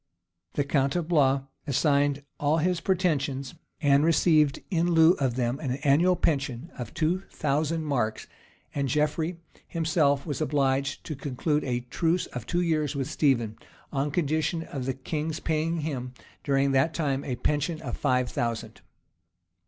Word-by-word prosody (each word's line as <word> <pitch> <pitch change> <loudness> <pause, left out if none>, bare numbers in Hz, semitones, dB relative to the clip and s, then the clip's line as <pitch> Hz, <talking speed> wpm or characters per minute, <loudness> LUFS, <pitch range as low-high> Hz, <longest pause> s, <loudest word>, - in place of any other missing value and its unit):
The 145 - +1
count 140 0 +1
of 175 -3 -1
Blois 140 -5 +3 0.2
assigned 145 0 +2 0.2
all 150 +2 +2
his 175 +1 +1
pretensions, 150 -7 0 0.3
and 140 0 +5
received 155 -3 +4
in 170 -1 +2
lieu 160 0 +7
of 130 -4 0
them 125 +1 -1
an 135 -5 -2
annual 165 +6 +4
pension 140 -3 -1
of 120 -3 -6
two 170 +4 +1
thousand 155 +3 -1
marks; 120 -7 -1 0.5
and 140 -2 -1
Geoffrey 155 +5 0 0.3
himself 155 -4 +1
was 150 -1 -3
obliged 140 -2 0
to 155 - -5
conclude 145 +3 -1
a 125 -2 -1
truce 165 +8 0
for 125 - -2
two 175 +10 -1
years 155 -4 0
with 135 -2 -2
Stephen, 120 -7 +1 0.3
on 140 +1 0
condition 160 +1 0
of 135 -5 -5
the 130 - -1
king's 155 +3 -3
paying 160 +1 -1
him, 130 -5 -4 0.3
during 140 -1 +2
that 135 +5 +2
time, 140 -4 0
a 125 - -3
pension 150 +5 -1
of 120 -5 -3
five 125 -3 +1
thousand. 115 -1 -3
145 Hz, 155 wpm, -27 LUFS, 135-160 Hz, 0.5 s, lieu